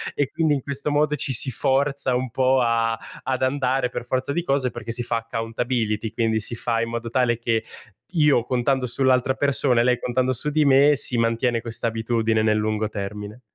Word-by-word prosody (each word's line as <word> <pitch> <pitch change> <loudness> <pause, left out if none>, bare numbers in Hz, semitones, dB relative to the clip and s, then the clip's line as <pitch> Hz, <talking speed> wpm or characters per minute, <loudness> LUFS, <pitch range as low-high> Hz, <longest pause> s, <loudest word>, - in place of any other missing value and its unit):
e 140 -2 0
quindi 160 -2 +1
in 140 - -1
questo 140 +2 -3
modo 150 +1 +2
ci 130 - -2
si 130 +3 +1
forza 135 +1 0
un 125 -1 -2
po' 130 0 +2
a 115 -1 +1 0.3
ad 130 -1 -2
andare 130 -1 +1
per 120 - -6
forza 130 +2 -1
di 175 - 0
cose 135 -6 0
perché 115 -1 -6
si 120 0 -2
fa 115 - -1
accountability, 115 -1 -2
quindi 110 -2 0
si 115 +2 -3
fa 115 0 -1
in 115 0 -1
modo 115 0 -4
tale 120 -2 +1
che 115 -1 0 0.5
io 150 -7 +3
contando 130 +1 0
sull'altra 130 +1 +2
persona 135 -3 +1
e - - +2
lei 125 0 +2
contando 130 +1 0
su 140 +4 -2
di 155 +1 +2
me 140 +1 +5
si 125 -2 0
mantiene 115 +1 +1
quest'abitudine 115 -1 -1
nel 110 -1 +2
lungo 110 0 -1
termine. 105 +2 -6
125 Hz, 195 wpm, -23 LUFS, 115-135 Hz, 0.5 s, me